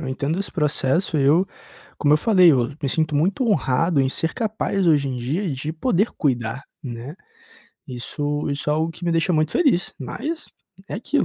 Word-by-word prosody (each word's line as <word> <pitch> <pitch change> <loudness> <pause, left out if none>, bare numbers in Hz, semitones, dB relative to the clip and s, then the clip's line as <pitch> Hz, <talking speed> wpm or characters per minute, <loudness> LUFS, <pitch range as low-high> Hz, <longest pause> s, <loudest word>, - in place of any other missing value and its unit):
eu 140 - -5
entendo 140 +5 -2
esse 200 - -4
processo, 150 +1 +1
eu 145 +6 +4 0.5
como 145 - +3
eu - - +5
falei, 185 0 +5
eu 125 -3 +2
me 140 - 0
sinto 155 +4 0
muito 185 - +1
honrado 165 - +2
em 135 - +2
ser 165 +4 -1
capaz 210 -4 -1
hoje 145 -4 +3
em 130 - -3
dia 155 +11 -2
de 145 +3 -3
poder 200 +4 +1
cuidar, 125 -3 -1 0.2
né. 125 +4 -7 0.7
Isso 145 +4 -3
isso 140 +1 -2
é - - +3
algo 160 +2 0
que 175 - -9
me 170 - +1
deixa 165 +2 +2
muito 155 -1 +2
feliz, 275 - +2
mas 300 - -5 0.4
é - - -5
aquilo, 245 +8 0
155 Hz, 185 wpm, -22 LUFS, 135-180 Hz, 0.7 s, eu